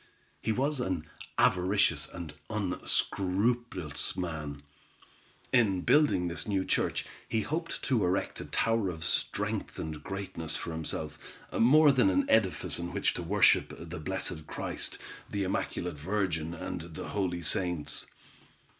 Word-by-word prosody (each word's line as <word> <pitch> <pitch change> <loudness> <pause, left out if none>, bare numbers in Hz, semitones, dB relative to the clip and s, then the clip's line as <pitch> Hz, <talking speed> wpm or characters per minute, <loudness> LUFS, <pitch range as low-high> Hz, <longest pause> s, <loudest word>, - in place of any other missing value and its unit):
He - - 0
was 135 +5 +1
an 95 -9 -1 0.3
avaricious 90 -5 +3
and 85 -3 -7 0.2
unscrupulous 95 -2 0
man. 75 -5 -4 0.9
In 105 -7 +4
building 145 - +4
this 85 0 -2
new 95 -2 +1
church, - - +1 0.2
he 110 - +1
hoped 165 +7 -3
to 125 -6 +2
erect 90 +2 0
a - - -6
tower 115 -4 +1
of 80 -2 -5
strength - - -1
and 80 -1 -4
greatness 95 -5 -4
for 85 - -4
himself, 80 -1 -4 0.3
more 145 +5 +7
than 125 -7 +4
an 95 0 +2
edifice 95 -7 +2
in 85 0 -4
which - - +2
to - - -3
worship 95 +3 +4
the - - -7
blessed 80 0 -3
Christ, - - -3 0.3
the 100 -1 -1
immaculate 90 -3 -2
Virgin, 85 -2 -1
and - - -4
the - - -5
holy 90 -4 -1
saints. 85 -1 0
95 Hz, 135 wpm, -30 LUFS, 80-105 Hz, 0.9 s, more